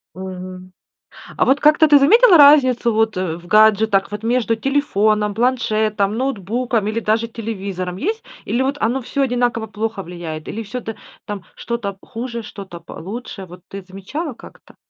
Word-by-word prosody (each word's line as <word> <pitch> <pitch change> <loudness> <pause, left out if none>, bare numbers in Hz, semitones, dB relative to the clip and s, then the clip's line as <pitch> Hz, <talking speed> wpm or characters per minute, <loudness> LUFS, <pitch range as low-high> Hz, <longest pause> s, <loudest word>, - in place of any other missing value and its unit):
Мгм. 185 0 -8 0.7
А - - +3
вот 275 +2 +2
как-то 305 +1 +5
ты 290 - +7
заметила 370 - +6
разницу 260 -5 +6
вот 220 -1 +1
в 175 -2 -4
гаджетах, 215 -1 +4
вот 210 +1 -6
между 230 -1 +1
телефоном, 215 -6 +1
планшетом, 215 -3 0
ноутбуком 235 -2 -1
или 220 +2 -1
даже 225 +1 0
телевизором, 195 -5 -5
есть? 435 - -2 0.2
Или 245 - -1
вот 275 +2 0
оно 245 +4 +1
всё 275 +3 -3
одинаково 245 -3 0
плохо 215 -1 -4
влияет, 165 -3 -7
или 225 - -4
всё 245 +4 -6
та 225 0 -6 0.3
там 200 -4 -6
что-то 220 -5 -4
хуже, 235 -1 -6
что-то 190 -5 -10
получше, 195 +2 -8
вот 180 0 -13
ты 195 0 -7
замечала 195 - -6
как-то? - - -16
220 Hz, 155 wpm, -19 LUFS, 195-250 Hz, 0.7 s, ты